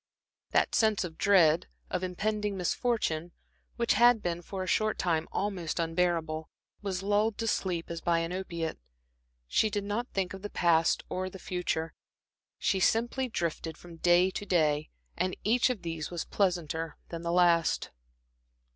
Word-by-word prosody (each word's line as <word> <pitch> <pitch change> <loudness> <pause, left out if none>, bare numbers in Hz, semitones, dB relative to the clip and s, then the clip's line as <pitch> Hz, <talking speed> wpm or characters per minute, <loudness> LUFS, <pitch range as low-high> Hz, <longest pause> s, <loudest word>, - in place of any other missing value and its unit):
That - - +2
sense 220 -4 +3
of 170 -3 -6
dread, 175 -4 +5 0.2
of 185 - -1
impending 210 +2 -1
misfortune, 175 -4 -1 0.4
which 235 -1 +2
had 240 0 +5
been 175 0 -2
for 190 +2 -5
a - - -6
short 215 +2 +1
time 165 -2 0
almost 185 -5 -2
unbearable, 165 -2 0 0.3
was 195 -2 -3
lulled 205 +2 +2
to 225 - -2
sleep 175 -6 -1
as 170 - -5
by 170 -1 +2
an 165 +1 -1
opiate. 170 - -4 0.7
She 215 - +2
did 205 -1 -2
not 210 +4 -2
think 195 -5 -2
of 195 - -8
the 205 - -5
past 165 -3 +3
or 185 0 -3
the 190 - -10
future, 175 -3 -2 0.6
she 195 - +1
simply 240 +6 +2
drifted 165 -4 -3
from 170 -1 -12
day 175 +2 +4
to 205 - -4
day, 155 -5 +1 0.3
and 185 +1 -1
each 235 +4 +3
of 240 -7 -3
these 165 -2 -4
was 175 -2 -4
pleasanter 165 -4 -1
than 170 -1 -5
the 170 0 -2
last. 170 -2 +3
180 Hz, 160 wpm, -30 LUFS, 165-205 Hz, 0.7 s, dread